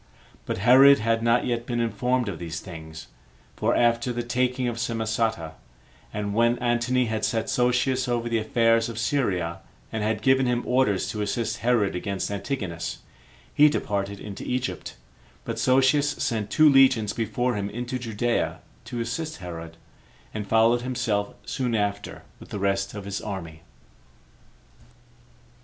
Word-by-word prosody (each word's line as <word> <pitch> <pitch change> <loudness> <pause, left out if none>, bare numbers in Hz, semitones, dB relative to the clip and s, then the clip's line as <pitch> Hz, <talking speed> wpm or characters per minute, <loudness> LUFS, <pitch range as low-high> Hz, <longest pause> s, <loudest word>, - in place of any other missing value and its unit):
But - - -2
Herod 130 +7 +7
had 115 +1 0
not 115 +1 +2
yet 120 -1 -2
been 120 -1 -1
informed 120 +2 0
of 95 -5 -4
these 85 -1 -5
things; 80 -3 -9 0.5
for - - +1
after 120 +1 +2
the 120 0 -3
taking 125 +1 0
of 115 -1 -3
Samosata, 110 -6 -1 0.6
and 105 -1 -3
when 115 +2 +3
Antony 120 +1 +1
had 110 -1 -3
set 115 -2 0
Sosius 125 +1 +1
over 120 -1 -1
the 115 -1 +1
affairs 115 +1 +2
of 115 - -7
Syria, 95 -10 -1 0.3
and 110 - -3
had 110 0 -1
given 130 0 +4
him 120 0 0
orders 125 -6 +1
to 105 - -4
assist 110 +3 -2
Herod 115 -6 +1
against 100 +2 -3
Antigonus, 100 -5 -4 0.5
he 150 +1 +6
departed 100 -7 -2
into 100 -2 -8
Egypt; 125 +1 -3 0.5
but - - -4
Sosius 135 +3 +3
sent 110 -4 -2
two 155 0 +5
legions 130 -7 +5
before 120 +2 -1
him 100 -2 -3
into 120 +4 -4
Judea 120 0 -1 0.2
to 120 - -4
assist 155 +8 -4
Herod, 85 -2 -8 0.6
and 105 -2 -4
followed 115 +3 +4
himself 120 -5 -2
soon 125 -3 -2
after 100 -1 -2 0.2
with - - -13
the - - -5
rest 100 0 -1
of 105 -2 -7
his 100 0 -4
army. 85 -6 -6
115 Hz, 150 wpm, -25 LUFS, 100-125 Hz, 0.6 s, Herod